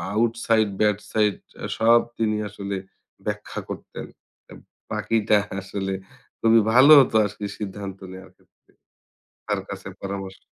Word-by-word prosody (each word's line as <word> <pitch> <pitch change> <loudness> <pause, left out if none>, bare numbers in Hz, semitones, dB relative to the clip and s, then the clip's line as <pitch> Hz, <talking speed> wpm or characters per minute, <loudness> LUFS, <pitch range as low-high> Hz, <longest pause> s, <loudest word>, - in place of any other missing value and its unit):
Outside 115 -1 +2
bad 105 -2 +3
side 105 -2 +2 0.4
সব 115 +1 +6 0.2
তিনি 110 -1 0
আসলে 100 -1 -5 0.5
ব্যাখ্যা - - -4
করতেন। - - -7 0.9
বাকিটা 110 -2 +2 0.2
আসলে 95 0 -4 0.5
খুবই 115 0 +6
ভালো 130 +4 +8
হতো 120 - -1
আজকে 105 0 -7 0.2
সিদ্ধান্ত 100 -1 -6
নেওয়ার 95 0 -11
ক্ষেত্রে। - - -33 0.8
তার - - -1
কাছে - - -7
পরামর্শ 95 -1 -5
105 Hz, 115 wpm, -24 LUFS, 100-115 Hz, 0.9 s, ভালো